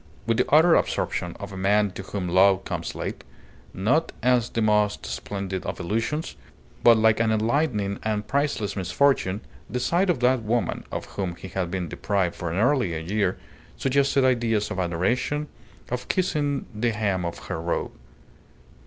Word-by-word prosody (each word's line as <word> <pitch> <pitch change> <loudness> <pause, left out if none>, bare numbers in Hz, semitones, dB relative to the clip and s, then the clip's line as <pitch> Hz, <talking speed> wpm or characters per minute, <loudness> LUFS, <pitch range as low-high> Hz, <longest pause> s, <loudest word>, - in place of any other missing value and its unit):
With 115 0 +1
the 125 - +1
utter 160 +3 +6
absorption - - 0
of - - -7
a - - -6
man 100 +1 +2
to 95 - -7
whom 95 -1 -4
love 95 +2 +4
comes - - -4
late, - - -5 0.5
not 120 - +1
as 125 -2 +3
the - - -3
most 105 -1 +2
splendid 95 -2 -4
of - - -5
illusions, 115 - -2 0.5
but 115 -1 +7
like 110 0 +4
an 115 -1 +2
enlightening 110 -3 0
and 105 -1 -1
priceless 140 -8 0
misfortune, 100 +1 +1 0.3
the 125 - -2
sight 175 +9 +1
of 165 -8 +2
that 125 0 +3
woman 115 +2 -1
(of - - -4
whom 95 -4 -4
he 95 - -9
had 90 -1 -2
been 90 -1 -3
deprived 95 +1 -1
for 85 -1 -4
nearly 110 - +2
a - - -2
year) 95 +3 0 0.4
suggested 135 0 +2
ideas 115 -5 +1
of 95 - -3
adoration, 110 - 0 0.4
of 125 0 -3
kissing 150 -7 0
the 115 +3 0
hem 100 -4 0
of 85 -1 -4
her 80 - -3
robe. 85 +1 -2
105 Hz, 165 wpm, -25 LUFS, 95-125 Hz, 0.5 s, but